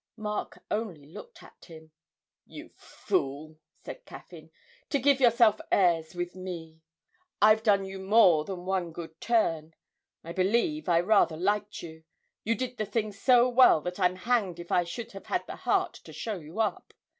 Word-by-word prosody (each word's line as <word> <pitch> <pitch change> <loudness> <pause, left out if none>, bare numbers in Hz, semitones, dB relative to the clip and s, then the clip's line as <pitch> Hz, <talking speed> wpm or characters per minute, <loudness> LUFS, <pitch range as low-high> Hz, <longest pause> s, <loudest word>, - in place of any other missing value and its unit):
Mark 210 -1 -5
only 200 -10 -3
looked 475 - -13
at - - -17
him. 160 -2 -14 0.6
'You - - -11
fool,' 155 +3 -4 0.3
said - - -9
Caffyn, - - -13 0.4
'to 285 - +1
give 275 0 +3
yourself 235 -4 +4
airs 170 -3 +2
with 175 0 -4
me. 170 -4 -8 0.6
I've 215 +1 +5
done 200 -3 +2
you 190 0 -8
more 190 -5 +4
than 180 +1 -7
one 185 -3 -2
good 165 -1 -10
turn. 165 -9 0 0.5
I 170 - -7
believe 230 - 0
I 170 -1 +4
rather 175 -4 +3
liked 205 +3 -2
you 160 -1 -11 0.4
you 230 +2 0
did 250 0 -5
the 215 - -2
thing 215 0 -2
so 240 +4 +4
well 250 -8 +6
that 180 +3 -6
I'm 180 -1 +2
hanged 195 -3 -1
if 175 - -9
I 175 - +2
should 225 +7 -7
have 195 - -11
had 365 - -2
the - - -8
heart - - 0
to - - -12
show 215 -5 -5
you 160 +6 -10
up. 220 - -2
190 Hz, 170 wpm, -28 LUFS, 170-225 Hz, 0.6 s, well